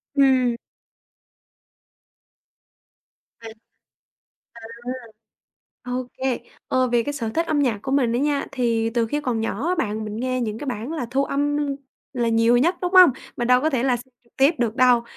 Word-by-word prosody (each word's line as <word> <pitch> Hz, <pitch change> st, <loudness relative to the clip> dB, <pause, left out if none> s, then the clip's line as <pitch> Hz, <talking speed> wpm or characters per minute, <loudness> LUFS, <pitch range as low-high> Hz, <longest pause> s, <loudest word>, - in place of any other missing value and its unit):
Ừm. 260 Hz, -3 st, +3 dB, 2.9 s
Ừ. 225 Hz, -, -8 dB, 1.0 s
À! 235 Hz, -, -13 dB, 1.2 s
Ô 250 Hz, 0 st, -4 dB
kê, 260 Hz, -2 st, 0 dB, 0.3 s
ờ, 255 Hz, 0 st, +2 dB
về 240 Hz, -1 st, +2 dB
cái 290 Hz, -, -3 dB
sở 235 Hz, -6 st, -3 dB
thích 330 Hz, +7 st, -1 dB
âm 305 Hz, -, 0 dB
nhạc 245 Hz, -7 st, +1 dB
của 270 Hz, -, -3 dB
mình 255 Hz, -5 st, +2 dB
á 240 Hz, -, 0 dB
nha, 285 Hz, +1 st, 0 dB
thì 230 Hz, -2 st, 0 dB
từ 235 Hz, -1 st, +2 dB
khi 295 Hz, +6 st, -2 dB
còn 250 Hz, -6 st, -2 dB
nhỏ 225 Hz, +6 st, -2 dB
á 365 Hz, -, +2 dB
bạn 220 Hz, -, -2 dB
mình 210 Hz, 0 st, -6 dB
nghe 255 Hz, +2 st, -1 dB
những 220 Hz, -2 st, -3 dB
cái 295 Hz, -, -7 dB
bản 245 Hz, +3 st, -4 dB
là 285 Hz, -7 st, -3 dB
thu 275 Hz, +1 st, +1 dB
âm 290 Hz, +1 st, -1 dB, 0.6 s
là 240 Hz, -3 st, 0 dB
nhiều 230 Hz, +1 st, +4 dB
nhất, 340 Hz, +9 st, +2 dB
đúng 360 Hz, +1 st, -1 dB
hông? 365 Hz, -5 st, +9 dB, 0.3 s
Mình 240 Hz, 0 st, -2 dB
đâu 250 Hz, 0 st, +5 dB
có 315 Hz, -, +1 dB
thể 260 Hz, -5 st, 0 dB
là 255 Hz, -2 st, +2 dB
xem 255 Hz, +2 st, -13 dB
trực 235 Hz, -, -31 dB
tiếp 275 Hz, +5 st, +4 dB
được 235 Hz, -1 st, -1 dB
đâu 250 Hz, -2 st, +5 dB
250 Hz, 180 wpm, -23 LUFS, 235-280 Hz, 2.9 s, hông